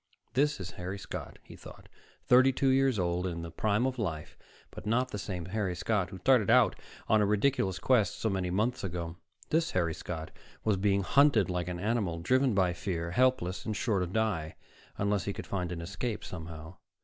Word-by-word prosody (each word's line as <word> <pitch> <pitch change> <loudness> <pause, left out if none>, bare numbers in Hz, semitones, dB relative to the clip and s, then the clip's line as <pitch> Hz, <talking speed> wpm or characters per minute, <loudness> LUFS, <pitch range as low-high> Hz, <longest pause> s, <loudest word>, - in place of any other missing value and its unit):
This 145 +2 +2
is 90 -2 -6
Harry 95 +3 -4
Scott, - - -7
he - - -13
thought, - - -13 0.4
thirty 130 +2 +6
two 135 +1 +1
years 135 -2 +3
old, 90 0 0
and 90 - -3
in 85 - -5
the 85 - -7
prime 105 +7 +1
of 130 -1 -2
life, 80 -8 -4 0.4
but - - -9
not 125 +4 +1
the 105 - -4
same 90 -3 -4
Harry 95 -1 -2
Scott 95 0 0
who 95 - -8
started 115 +2 +3
out - - +5 0.3
on 110 -1 +4
a - - +4
ridiculous 105 -2 +1
quest 110 -3 +2
so - - -1
many 95 -3 -1
months 110 +7 0
ago. 85 -2 -4 0.3
This 160 +1 +2
Harry 85 -3 0
Scott 80 0 -6 0.3
was 105 -3 +2
being 100 0 +2
hunted 115 - +4
like 90 -1 -2
an 90 -1 -4
animal, 105 -4 0
driven 130 +7 +2
by 90 -2 +3
fear, 85 -2 -3
helpless, 115 -5 +1
and 110 - -3
sure 105 -6 +1
to 90 - -1
die, 95 -6 -1 0.4
unless 100 -2 0
he 100 - -2
could - - -7
find 90 -3 -3
an 85 -1 -4
escape, 105 +6 -4
somehow. 80 0 -8
100 Hz, 200 wpm, -30 LUFS, 90-115 Hz, 0.4 s, thirty